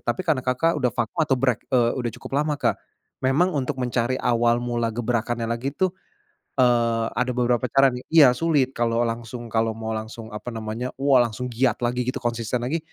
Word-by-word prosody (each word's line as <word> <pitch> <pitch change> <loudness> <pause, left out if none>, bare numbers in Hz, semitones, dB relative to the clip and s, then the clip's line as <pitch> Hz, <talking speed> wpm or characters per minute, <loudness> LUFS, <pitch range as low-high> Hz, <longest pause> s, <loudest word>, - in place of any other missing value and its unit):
Tapi 185 - -2
karena 145 -6 +1
Kakak 130 +7 +1
udah 125 -5 +1
vakum 120 -2 -3
atau 135 -4 +1
break, 125 -1 -1
eee, 120 -2 +3
udah 120 -3 -2
cukup - - -8
lama, 150 -2 -2
Kak. - - 0 0.4
Memang 150 +7 +2
untuk 130 -2 -2
mencari 125 0 0
awal 120 0 +2
mula 120 -1 -1
gebrakannya 120 0 -1
lagi 120 +4 -2
tuh, 185 +4 +1 0.7
eee, 115 -2 +3
ada 125 0 -1
beberapa 125 0 +1
cara 135 +2 +4
nih. 125 0 -7
Iya 150 -6 +8
sulit 145 -5 +2
kalo 115 0 +1
langsung, 115 0 -4
kalo 110 0 +1
mau 110 0 -5
langsung 110 +1 -7
apa 105 +3 -6
namanya, 110 +3 -4
wah 135 -1 +3
langsung 125 +3 -5
giat 120 0 0
lagi 125 +1 0
gitu 130 - -3
konsisten 120 0 -2
lagi, 145 +7 -1
120 Hz, 190 wpm, -24 LUFS, 115-130 Hz, 0.7 s, Iya